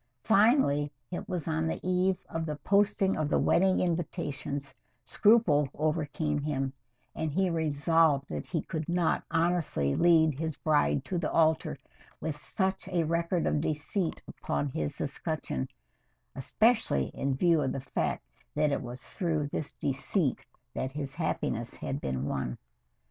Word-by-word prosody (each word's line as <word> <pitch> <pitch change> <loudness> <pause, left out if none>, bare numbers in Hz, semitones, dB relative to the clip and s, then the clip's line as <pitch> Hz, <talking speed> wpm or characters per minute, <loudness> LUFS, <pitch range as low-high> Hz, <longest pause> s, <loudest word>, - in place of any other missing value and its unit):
Finally 200 - +4 0.2
it 175 - -5
was 175 -4 -3
on 160 0 0
the 160 - -2
eve 185 +1 +2
of 165 0 -3
the 150 - -2
posting 195 +4 +2
of 155 -1 -1
the - - +2
wedding 190 +1 +3
invitations 145 -5 -2 0.3
scruple 185 - +4
overcame 150 -1 -1
him, 135 -2 -2 0.4
and 160 -1 -2
he 190 +4 +1
resolved 155 -2 +2
that - - -5
he 165 -4 -2
could 160 -1 -4
not 175 -1 +1
honestly 165 - +1
lead 160 -2 +5
his 160 +2 -3
bride 110 - +1
to 180 - -2
the 160 - -2
altar 160 -1 +2 0.4
with 155 - -3
such 190 +5 -2
a 180 -3 +1
record 170 +2 0
of 150 - +1
deceit 160 +4 -1
upon 145 - -2
his 75 - -3
escutcheon, 65 0 -3 0.7
especially 210 - +2
in 135 -1 -1
view 165 +2 +3
of 135 -2 0
the - - -3
fact 130 - -2 0.3
that 150 0 +2
it - - 0
was 125 0 -8
through 165 -6 -1
this 145 0 -4
deceit 140 +3 -1 0.3
that 130 - -3
his 140 -2 -4
happiness 120 -7 -2
had 135 +1 -4
been 65 +1 -2
won. 65 -4 -2
155 Hz, 150 wpm, -29 LUFS, 140-175 Hz, 0.7 s, lead